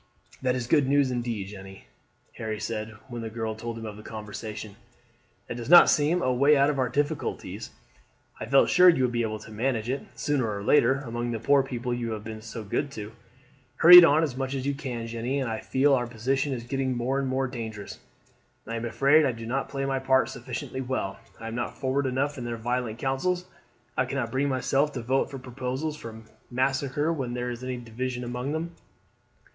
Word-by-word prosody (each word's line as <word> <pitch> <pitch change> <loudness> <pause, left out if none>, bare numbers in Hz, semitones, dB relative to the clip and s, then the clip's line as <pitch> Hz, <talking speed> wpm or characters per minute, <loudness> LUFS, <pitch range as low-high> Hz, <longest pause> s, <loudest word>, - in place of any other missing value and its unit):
"That 130 -1 +1
is 125 -2 -2
good 140 +2 +3
news 140 -1 +3
indeed, 120 -5 -3
Jeanne," 95 -1 -11 0.5
Harry 110 -1 -4
said, 110 +1 -4
when 120 -2 -6
the 115 - -4
girl 110 0 -3
told 115 +1 -6
him 115 - -7
of 105 -1 -7
the - - -10
conversation. 110 -1 -7 0.7
"That 120 - -5
does 140 +9 +7
seem 155 +4 +2
a 130 - +2
way 140 +4 +5
out 140 +2 +4
of 140 - -4
our 125 -2 +1
difficulties. 145 +3 -2 0.7
I - - -5
felt 140 - +5
sure 180 0 +8
you 165 -7 +3
would 125 - +2
be 120 -1 0
able 110 -1 -2
to 110 0 -12
manage 115 +1 -1
it, 135 - -2
sooner 135 -7 0
or 100 -1 -4
later, 135 +3 +4
among 120 0 -3
the 115 -1 -2
poor 140 +4 +4
people 125 -2 -3
you 120 -2 -2
have 105 -1 -6
been 110 0 -7
so 110 0 -7
good 140 +8 -2
to. 105 -2 -7 0.6
Hurry 180 +5 +11
it - - +8
on 155 0 +5
as 145 -6 -2
much 135 +1 -3
as 130 -1 -3
you 140 - +1
can, 130 -5 -5
Jeanne. 120 +4 -2
I 110 -2 -3
feel 140 +2 +2
that 135 - +5
our 120 - -3
position 135 +5 -1
is 120 -3 -3
getting 130 0 -2
more 130 +3 0
and 135 - -1
more 130 +1 0
dangerous. 110 -5 -7 0.7
I 115 +1 -4
am 115 - -4
afraid 140 +6 +4
I 135 - +2
do 115 0 -8
not 130 +4 -2
play 135 -1 -3
my 135 -1 0
part 130 0 +3
sufficiently 125 +1 -5
well. 125 -7 -3 0.2
I 115 - -7
am 115 - -5
not 120 - -4
forward 135 +1 0
enough 140 +2 -1
in - - -5
their 120 -1 -3
violent 120 -1 -2
councils. 175 +9 -1 0.5
I 130 - +2
cannot 130 -3 -3
bring 140 +2 +1
myself 140 +2 +1
to 125 - -5
vote 130 +3 +1
for 135 - -7
proposals 130 +4 -4
for 110 -5 -9 0.3
massacre 135 +4 0
when 130 -6 -3
there 125 0 -2
is 120 +1 -7
any 130 -1 -3
division 125 +1 -4
among 125 +4 -3
them. 165 +2 -3
125 Hz, 215 wpm, -27 LUFS, 115-135 Hz, 0.7 s, Hurry